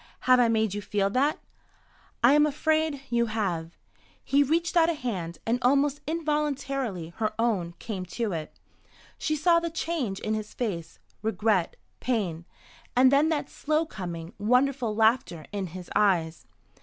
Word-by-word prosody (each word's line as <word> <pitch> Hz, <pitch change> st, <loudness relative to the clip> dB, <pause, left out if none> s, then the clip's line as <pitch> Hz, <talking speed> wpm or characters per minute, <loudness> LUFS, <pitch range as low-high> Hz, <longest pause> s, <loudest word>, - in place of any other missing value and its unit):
Have 255 Hz, 0 st, +5 dB
I 245 Hz, -, +5 dB
made 220 Hz, -3 st, +1 dB
you 205 Hz, -, -3 dB
feel 200 Hz, 0 st, 0 dB
that?" 280 Hz, +6 st, +2 dB, 0.9 s
"I 245 Hz, +4 st, +7 dB
am 295 Hz, +1 st, +5 dB
afraid 310 Hz, -1 st, 0 dB
you 235 Hz, 0 st, +2 dB
have." 180 Hz, -7 st, -2 dB, 0.5 s
He 280 Hz, +1 st, +3 dB
reached 335 Hz, +5 st, +1 dB
out 335 Hz, -1 st, +5 dB
a 335 Hz, -, 0 dB
hand, 185 Hz, -, -4 dB
and 235 Hz, +2 st, +1 dB
almost 280 Hz, +3 st, +2 dB
involuntarily 280 Hz, -, -2 dB
her 215 Hz, -1 st, -1 dB
own 200 Hz, -8 st, 0 dB
came 190 Hz, -5 st, -5 dB
to 230 Hz, -4 st, 0 dB
it. 160 Hz, -3 st, -5 dB, 0.6 s
She 310 Hz, -, 0 dB
saw 335 Hz, +3 st, +4 dB
the 335 Hz, 0 st, -3 dB
change 315 Hz, -, -2 dB
in 215 Hz, -, -2 dB
his 215 Hz, -1 st, -5 dB
face, 190 Hz, -9 st, -4 dB, 0.2 s
regret, 215 Hz, -4 st, +1 dB, 0.2 s
pain, 185 Hz, -10 st, -2 dB, 0.5 s
and 255 Hz, +1 st, +6 dB
then 290 Hz, +3 st, +4 dB
that 310 Hz, -3 st, -1 dB
slow 310 Hz, +2 st, 0 dB
coming, 175 Hz, -, -7 dB
wonderful 250 Hz, +1 st, +2 dB
laughter 220 Hz, -7 st, +2 dB
in 200 Hz, -3 st, -3 dB
his 180 Hz, +1 st, -9 dB
eyes. 175 Hz, -6 st, +1 dB
230 Hz, 155 wpm, -27 LUFS, 195-285 Hz, 0.9 s, I